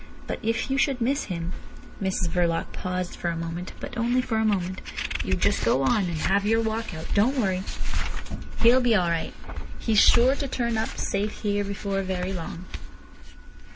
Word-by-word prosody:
But - - -4
if 230 +4 -1
you 270 - +2
should 270 -2 +2
miss 270 +5 +1
him—" 170 -2 -4 0.5
Mrs 190 -2 0
Verloc 170 -1 0
paused 180 -1 -3
for - - -4
a 170 - -2
moment, 165 +2 -4
but - - -7
only 240 +2 +2
for 250 -3 0
a 220 - +2
moment. 190 -3 0 0.4
"You - - +1
just - - +1
go 135 - +3
on, 190 +9 +3
and 170 -2 -2
have 195 +5 +2
your 225 +2 +3
walk 220 -3 -2
out. 160 - -6
Don't 240 +7 +3
worry. 190 -6 +1 1.0
He'll 245 +3 +7
be 240 -3 +4
all 180 -4 +3
right. 165 -1 -2 0.4
He's 220 -3 +2
sure 245 +3 +6
to 280 - -2
turn 235 -3 -1
up 220 0 0
safe 205 +2 -2
here 205 -1 +1
before 200 0 -2
very 185 0 -2
long." 170 0 -6
200 Hz, 185 wpm, -26 LUFS, 180-230 Hz, 1.0 s, He'll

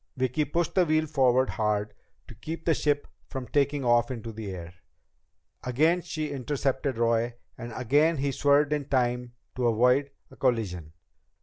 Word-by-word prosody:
Vicki 130 +4 0
pushed 170 +3 -1
the 185 - +4
wheel 155 -1 +2
forward 130 -3 +2
hard 105 -1 -1 0.3
to - - -11
keep 160 +9 -7
the 165 - +4
ship 145 -1 0 0.2
from 130 -2 -5
taking 140 -1 +1
off 120 -1 +3
into 115 -3 -5
the 110 -2 -7
air. 85 -2 -7 0.9
Again 155 +8 +2
she 155 -3 -4
intercepted 135 -1 -2
Roy, 115 0 +1 0.2
and 120 0 -8
again 145 +6 +2
he 140 0 0
swerved 145 +2 +3
in 145 -2 -2
time 125 -2 0 0.2
to 125 -1 0
avoid 125 +5 +3 0.2
a - - -13
collision. 95 - -1
130 Hz, 160 wpm, -27 LUFS, 120-145 Hz, 0.9 s, the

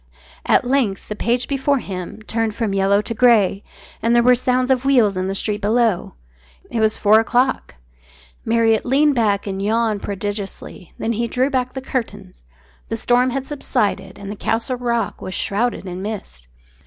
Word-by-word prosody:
At - - +3
length 245 -7 0
the 210 - -3
page 240 +3 0
before 280 0 +1
him 195 -2 -6
turned 225 -1 -2
from 220 -4 -1
yellow 195 +1 +2
to 230 - -4
grey, 215 -4 +3 0.4
and 230 +1 +2
there 235 - +5
were 250 +1 +6
sounds 255 +1 +1
of 255 -1 +2
wheels 245 -8 +3
in 185 0 -2
the 195 - -2
street 210 +1 -1
below. 215 - +1 0.6
It 235 - -1
was 220 -1 +2
four 215 +1 +5
o'clock. 245 - 0 0.7
Marriott 225 -1 +2
leaned 285 +3 +3
back 210 -5 +1
and 195 -1 -4
yawned 220 0 0
prodigiously. 200 -2 -6
Then 230 - -1
he 235 +2 -1
drew 260 +4 0
back 255 -2 -1
the 265 - -5
curtains. 240 - -5 0.5
The 225 - -2
storm 245 +3 +2
had 265 +1 -3
subsided 205 -9 -2
and 200 0 -7
the - - -5
Castle 230 +4 -1
Rock 235 -1 -2
was 185 - -5
shrouded 225 +1 -1
in 180 0 -6
mist. 190 - -7
225 Hz, 175 wpm, -20 LUFS, 200-250 Hz, 0.7 s, were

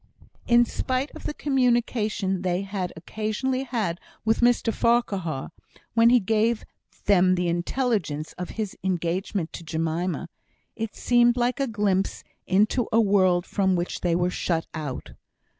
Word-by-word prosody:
In 240 0 +6
spite 255 +4 -2
of - - -11
the - - -2
communication 235 -8 +1
they 185 +1 -1 0.3
occasionally 220 +9 -2
had 210 -9 -2 0.3
with 225 0 +2
Mr 240 -1 +3
Farquhar, 190 - 0 0.4
when 230 +1 +5
he 245 0 +6
gave 220 +2 +1 0.4
them 185 -2 +4
the 180 -1 0
intelligence 170 - -1
of 180 - -6
his 215 -3 -3
engagement 180 0 -1
to - - -7
Jemima, 165 +2 -2 0.5
it 225 -2 -4
seemed 240 0 +3
like 245 +2 +1
a 275 - +1
glimpse 205 -4 0 0.2
into 210 +6 +2
a 225 - +4
world 190 -4 +3
from 190 -2 +1
which 175 0 -3
they 175 -2 +1
were 175 +1 +1
shut 165 -2 -1
out. 150 -5 -5
200 Hz, 140 wpm, -25 LUFS, 175-235 Hz, 0.5 s, In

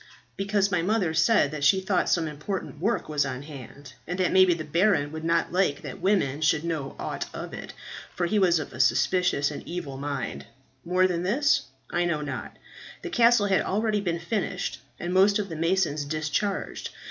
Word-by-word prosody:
"Because 195 0 +1
my 180 -3 +2
mother 185 -3 +1
said 160 -1 +3
that 150 -2 -5
she 190 +6 +5
thought 190 -1 0
some 165 -2 +2
important 150 +1 -5
work 215 +8 0
was 150 -2 +1
on 135 0 -4
hand, 140 -1 -11
and 180 +2 -3
that 185 -2 +1
maybe 185 -2 +5
the 160 - -5
baron 160 -1 +2
would 160 0 -6
not 165 0 +1
like 180 -6 +1
that - - -7
women 170 -8 +1
should 155 0 +2
know 155 -5 -3
aught - - -4
of - - -6
it, - - -8 0.4
for 175 - 0
he 210 +4 +1
was 175 -3 +4
of 155 - -4
suspicious 155 +2 +2
and 145 - -6
evil 165 -6 -5
mind. 135 - -4 0.4
More 180 +2 +2
than 175 -2 0
this 250 +11 +2 0.3
I 175 - +1
know 160 -3 0
not. 145 - -6 0.5
The - - -5
castle 235 -3 +5
had 195 -1 +2
already 210 +1 0
been 170 -4 -1
finished, 190 +4 -3 0.2
and 175 +1 -3
most 195 +2 +5
of 205 -2 -3
the 165 - -5
masons 165 -2 +1
discharged. 155 +6 -2
170 Hz, 190 wpm, -26 LUFS, 150-195 Hz, 0.5 s, she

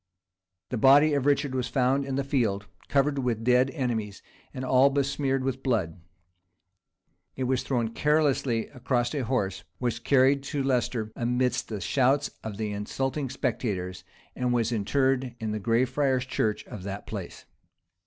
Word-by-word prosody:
The 125 - -2
body 145 +5 +6
of 140 -1 +1
Richard 140 -1 +2
was 130 -2 -1
found 135 +1 +1
in 135 -1 -3
the 140 - 0
field, 115 -7 0 0.2
covered 140 0 +2
with 120 -4 -1
dead 125 +2 +4
enemies, 115 -8 -3 0.3
and 130 - -5
all 130 +2 +5
besmeared 135 -1 0
with 135 0 -2
blood: 105 - -1 1.3
it 130 - -3
was 130 0 +1
thrown 120 -4 -1
carelessly 140 -4 +1
across 125 -1 -1
a 140 -3 -1
horse; 100 -7 -1 0.2
was 120 -2 -1
carried 135 +2 +3
to 140 -1 -2
Leicester 120 -4 0
amidst 125 +1 0
the 105 -3 -4
shouts 135 +8 +2
of 110 -3 -6
the 110 -1 -2
insulting 135 +7 -2
spectators; 95 -8 -3 0.3
and 125 -1 0
was 120 -1 +1
interred 130 +3 0
in 110 -1 -3
the 105 - -2
Gray 115 +4 +2
Friars' 130 0 0
church 110 -4 -1
of 105 - -8
that 100 +1 -6
place. 100 -5 -7
125 Hz, 155 wpm, -27 LUFS, 110-135 Hz, 1.3 s, body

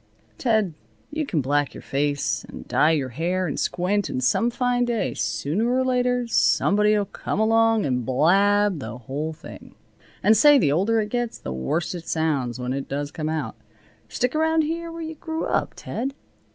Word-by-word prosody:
Ted, 220 -8 +1 0.4
you 310 -1 -2
can 160 - 0
black 145 +2 0
your - - -8
face, 145 +1 -1
and - - -11
dye 155 - +3
your 145 -5 0
hair, 175 +8 -1
and 150 - -3
squint, 195 +3 0
and 130 - -2
some 225 - +2
fine 245 0 0
day, 235 -2 -1
sooner 200 +12 -1
or 260 +1 +2
later, 250 -1 +1
somebody'll 210 -2 +3
come 195 - -4
along 225 0 +3
and 125 -3 0
blab 195 - +3
the 110 -2 -6
whole 140 +6 -4
thing. 155 - -12 0.5
And 215 +3 +6
say, 295 +4 +7
the 145 - +3
older 200 +9 +2
it 210 - -4
gets 240 0 -2
the 65 - -6
worse 115 - -2
it 170 -2 -8
sounds, 145 -8 -1
when 125 +1 -2
it 135 0 -4
does 145 +1 -3
come 155 -1 -3
out. 150 -9 -3 0.5
Stick 250 0 -1
around 320 +1 +2
here 335 +2 -3
where 330 0 -6
you 320 0 -5
grew 320 +1 -4
up, - - -1
Ted." 270 +4 -4
195 Hz, 180 wpm, -24 LUFS, 145-240 Hz, 0.5 s, say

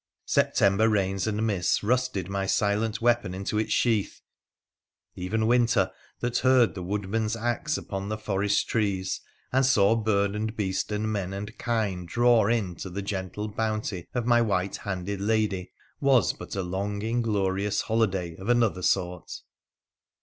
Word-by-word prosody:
September 100 +3 +3
rains 95 -2 0
and 110 +1 0
mists 100 -4 +1
rusted 125 -5 0
my 100 0 -2
silent 105 +3 0
weapon 120 -6 +2
into 100 +3 -2
its 110 - -2
sheath; 110 -5 +1 0.9
even 110 +5 -1
winter, 120 0 +3 0.3
that 120 0 0
heard 125 -7 +4
the 90 - -6
woodman's 105 +4 -1
axe 120 +6 -1
upon 100 0 -5
the 110 - -2
forest 105 -1 0
trees, 95 -4 -1 0.3
and 135 +1 +4
saw 110 -5 +4
bird 100 -2 +1
and 110 +1 -3
beast 95 0 -1
and 105 +1 -1
men 95 -2 -3
and 105 +2 -6
kiue 110 -6 -1
draw 120 +1 +4
in 110 -6 0
to 95 - -7
the 100 +3 -5
gentle 100 +2 -4
bounty 110 -4 -3
of 120 -2 0
my 120 -1 +4
white 100 -4 0
handed 95 0 -4
lady, 105 -3 0 0.3
was 135 -5 +3
but - - -8
a 95 - -1
long 100 +3 -3
inglorious 105 -4 0
holiday 95 -7 0
of 95 +4 -6
another 115 -6 +2
sort. 90 -1 -1
105 Hz, 150 wpm, -27 LUFS, 95-115 Hz, 0.9 s, heard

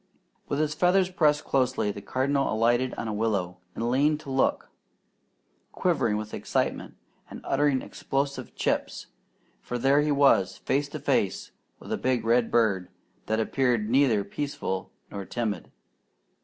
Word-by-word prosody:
With 140 - -1
his 150 0 0
feathers 180 +3 +3
pressed 150 -4 +2
closely, 130 -5 +1
the 100 - -8
Cardinal 135 +5 0
alighted 120 +3 +2
on 115 - -4
a 110 - -2
willow, 100 -5 -1 0.2
and 120 +1 -1
leaned 150 +4 +2
to 140 - -8
look, 135 - 0 1.0
quivering 130 -12 +1
with 110 0 -6
excitement - - -2 0.3
and - - -8
uttering 140 -1 +1
explosive 140 -2 -3
"chips"; - - -1 0.6
for 125 - -4
there 135 +4 +3
he 150 0 +1
was, 140 -10 +3
face 145 +1 -1
to - - -6
face - - 0 0.3
with - - -6
a - - 0
big 125 -3 0
redbird 115 -5 +2 0.4
that 110 +1 0
appeared 115 -2 +1
neither 125 -6 +3
peaceful 100 -4 -4 0.2
nor 100 -1 -5
timid. 105 -3 -3
130 Hz, 140 wpm, -27 LUFS, 110-140 Hz, 1.0 s, feathers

